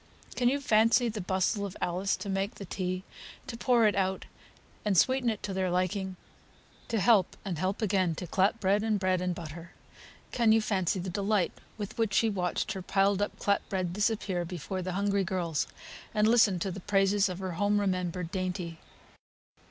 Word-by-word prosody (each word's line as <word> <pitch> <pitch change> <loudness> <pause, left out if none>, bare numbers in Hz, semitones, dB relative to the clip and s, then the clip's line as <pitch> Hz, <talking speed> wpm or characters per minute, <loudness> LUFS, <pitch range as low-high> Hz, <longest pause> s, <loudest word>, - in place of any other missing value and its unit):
Can 245 -1 +3
you 280 +2 0
fancy 230 -1 +4
the 215 -1 -4
bustle 190 +3 0
of 195 -2 -5
Alice 180 +3 0
to 200 - -7
make 195 +1 -1
the 200 - -8
tea, 185 0 -3 0.4
to 230 - -6
pour 240 -1 +3
it 210 - +4
out, 190 0 -1 0.6
and 205 -3 +1
sweeten 260 +4 +3
it 215 -3 -3
to 195 - -3
their 190 -1 0
liking, 185 +1 -1 0.7
to 225 - 0
help 205 -3 +3
and 175 -5 -3
help 190 +5 -1
again 185 -5 +1
to 180 - -5
clap 195 +6 +1
bread 200 0 +2
and 215 -1 +1
bread 185 -1 +1
and 180 -1 -1
butter? 165 0 -9 0.6
Can 235 -3 +3
you 225 - +5
fancy 195 -4 0
the 180 +1 -4
delight 200 -1 +1 0.3
with 205 +1 -6
which 215 -4 +1
she 225 -1 +3
watched 180 -2 -1
her 190 -1 -4
piled 195 +1 +2
up 205 - -2
clap 200 0 0
bread 185 -3 -1
disappear 205 -3 0
before 180 +2 -5
the 185 0 -3
hungry 200 +1 +1
girls, 175 -4 -1 0.5
and 210 0 +4
listened 215 -6 +4
to 195 - -2
the 190 - -6
praises 195 +1 +2
of 180 - -4
her 190 -1 -4
home 205 +4 +1
remembered 180 -3 -1
dainty? 180 -3 -3
195 Hz, 190 wpm, -29 LUFS, 185-210 Hz, 0.7 s, you